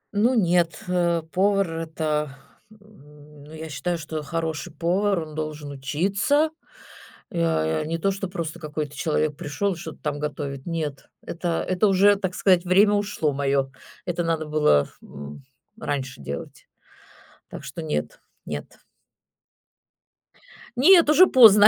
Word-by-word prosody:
Ну, 235 Hz, +5 st, +3 dB
нет, 175 Hz, -4 st, +2 dB
э, 170 Hz, -2 st, +1 dB
повар- 195 Hz, -1 st, +2 dB
это, 155 Hz, -3 st, -2 dB, 0.3 s
м, 150 Hz, -8 st, -17 dB
ну, 150 Hz, -, -14 dB
я 160 Hz, 0 st, -7 dB
считаю, 170 Hz, +4 st, -2 dB
что 155 Hz, -1 st, -5 dB
хороший 160 Hz, +1 st, -3 dB
повар, 185 Hz, +2 st, +1 dB
он 155 Hz, -1 st, -8 dB
должен 155 Hz, -1 st, -5 dB
учиться. 195 Hz, -, +1 dB, 0.8 s
Э, 80 Hz, -, +1 dB
не 165 Hz, +2 st, -2 dB
то 195 Hz, -, +1 dB
что 195 Hz, 0 st, -4 dB
просто 170 Hz, -2 st, -5 dB
какой-то 150 Hz, -2 st, -5 dB
человек 155 Hz, 0 st, 0 dB
пришёл, 195 Hz, +7 st, -1 dB
и -, -, -9 dB
что-то 160 Hz, -1 st, -8 dB
там 145 Hz, -1 st, -2 dB
готовит. 145 Hz, -2 st, -4 dB
Нет, 155 Hz, -4 st, -4 dB
это, 170 Hz, 0 st, -2 dB
это 185 Hz, +3 st, +2 dB
уже, 200 Hz, +1 st, +5 dB
так 190 Hz, -2 st, -3 dB
сказать, 185 Hz, -3 st, +4 dB
время 200 Hz, +3 st, +5 dB
ушло 205 Hz, -7 st, 0 dB
моё, 135 Hz, -1 st, 0 dB, 0.3 s
это 175 Hz, -1 st, -1 dB
надо 165 Hz, -1 st, -1 dB
было, 150 Hz, -, +3 dB
м, 70 Hz, -, -10 dB, 0.4 s
раньше 130 Hz, -, -3 dB
делать. 70 Hz, +1 st, -7 dB, 0.8 s
Так -, -, -9 dB
что -, -, -6 dB
нет, 75 Hz, 0 st, -3 dB, 0.3 s
нет. 75 Hz, -1 st, -6 dB, 2.0 s
Нет, 335 Hz, +4 st, +7 dB
уже 330 Hz, +5 st, +7 dB
поздно, 210 Hz, -, +8 dB
165 Hz, 135 wpm, -24 LUFS, 150-195 Hz, 2.0 s, поздно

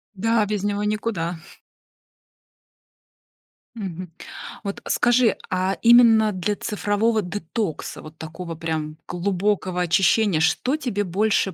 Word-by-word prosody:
Да, 225 Hz, +2 st, +2 dB
без 205 Hz, -1 st, -2 dB
него 205 Hz, 0 st, -1 dB
никуда. 210 Hz, -5 st, -2 dB, 2.4 s
Мгм. 185 Hz, -5 st, -6 dB, 0.5 s
Вот 200 Hz, -1 st, -5 dB
скажи, 245 Hz, -1 st, +3 dB
а 185 Hz, +1 st, 0 dB
именно 230 Hz, -2 st, +6 dB
для 190 Hz, +3 st, -1 dB
цифрового 210 Hz, +2 st, 0 dB
детокса, 180 Hz, -1 st, -4 dB
вот 155 Hz, +1 st, -12 dB
такого 165 Hz, +1 st, -7 dB
прям 155 Hz, -1 st, -4 dB
глубокого 185 Hz, 0 st, -1 dB
очищения, 180 Hz, +1 st, +3 dB
что 250 Hz, -, +1 dB
тебе 240 Hz, -9 st, -2 dB
больше 195 Hz, 0 st, +1 dB
200 Hz, 105 wpm, -23 LUFS, 175-215 Hz, 2.4 s, именно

